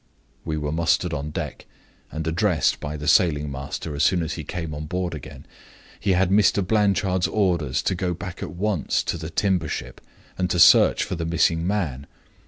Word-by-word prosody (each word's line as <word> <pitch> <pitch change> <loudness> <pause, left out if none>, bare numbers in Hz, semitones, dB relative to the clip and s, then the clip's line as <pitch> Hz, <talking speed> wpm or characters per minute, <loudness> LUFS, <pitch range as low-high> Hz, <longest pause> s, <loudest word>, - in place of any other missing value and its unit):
"We 80 -1 -3
were 75 -1 -3
mustered 80 +1 +1
on 75 0 -3
deck, - - -6 0.4
and 80 0 -4
addressed 80 -1 +1
by 75 +1 -5
the 75 0 -6
sailing 75 -4 +3
master 70 +3 -5
as 70 - -2
soon 85 +3 +3
as 80 - -3
he - - -6
came 80 -3 -5
on 75 +1 -6
board 90 +1 -2
again. 75 -5 -9 0.5
He 100 - +1
had 95 0 +2
Mr. 100 -1 +3
Blanchard's 100 -3 +1
orders 85 -10 0
to - - +1
go 90 -1 -2
back 90 +2 -8
at - - -4
once 95 -3 -1
to - - -2
the 80 -1 -6
timber 90 -1 0
ship - - -6 0.4
and 90 0 0
to 90 - 0
search 85 - +6
for - - -5
the 85 -2 -3
missing 85 0 +1
man. 80 -9 -2
85 Hz, 190 wpm, -23 LUFS, 75-95 Hz, 0.5 s, search